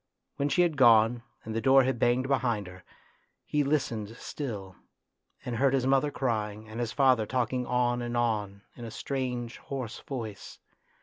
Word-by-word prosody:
When 140 +1 0
she 175 +6 +4
had 165 -4 0
gone 115 -2 +5 0.2
and 110 - -5
the 115 - 0
door 135 +1 +6
had 130 -2 -1
banged 125 +3 +2
behind 120 -6 0
her, 90 0 -12 0.6
he 150 -1 +1
listened 115 -6 -1
still, 100 -10 -6 0.7
and 120 -2 -3
heard 135 +1 +3
his 130 -2 0
mother 135 +2 +3
crying 110 -5 -2
and 110 +2 -7
his 120 -2 -2
father 130 -5 +3
talking 125 0 -1
on 125 0 +1
and 120 0 -3
on 105 -4 -1
in 120 - -10
a 115 - -5
strange, 125 -1 -4
hoarse 130 -5 -6
voice. 115 -7 -7
120 Hz, 170 wpm, -29 LUFS, 110-135 Hz, 0.7 s, door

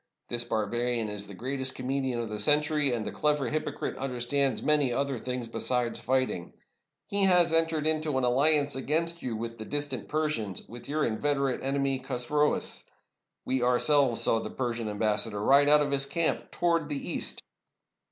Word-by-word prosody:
This 120 0 -1
barbarian 120 +1 -1
is 105 -1 -6
the 100 - -10
greatest 130 +4 -3
comedian 130 -1 -2
of 115 - -4
the 105 -1 -5
century, 150 +3 +2
and 115 -3 -2
the - - -4
clever 150 -4 0
h)Apocrite 150 -1 -3
understands 130 0 -1
many 150 -4 +3
other 135 0 -1
things 125 -1 -4
be 115 0 -6
sides 125 0 0
fighting. 130 -9 -1 0.5
He 200 -1 +2
has 175 -3 +5
entered 165 -2 +2
into 155 -2 +1
an 130 - 0
alliance 140 +4 +3
against 165 +5 -1
you 120 -3 -3
with 115 +1 -6
the 110 - -6
distant 145 -6 -3
Persians, 150 - -2
with 120 +4 -10
your 155 +1 0
inveterate 140 +3 -1
enemy 135 0 0
Chosroes. 135 +3 0 0.6
We 130 -1 0
ourselves 125 0 +4
saw 115 - +3
the - - -6
Persian 120 -3 -3
am 105 - -5
bassador 105 0 0
ride 140 +6 +5
out 150 0 +6
of 145 - -3
his 135 0 +2
camp 170 +2 -1
towards 165 -3 0
the 145 -2 -4
East." - - -2
135 Hz, 170 wpm, -28 LUFS, 120-150 Hz, 0.6 s, out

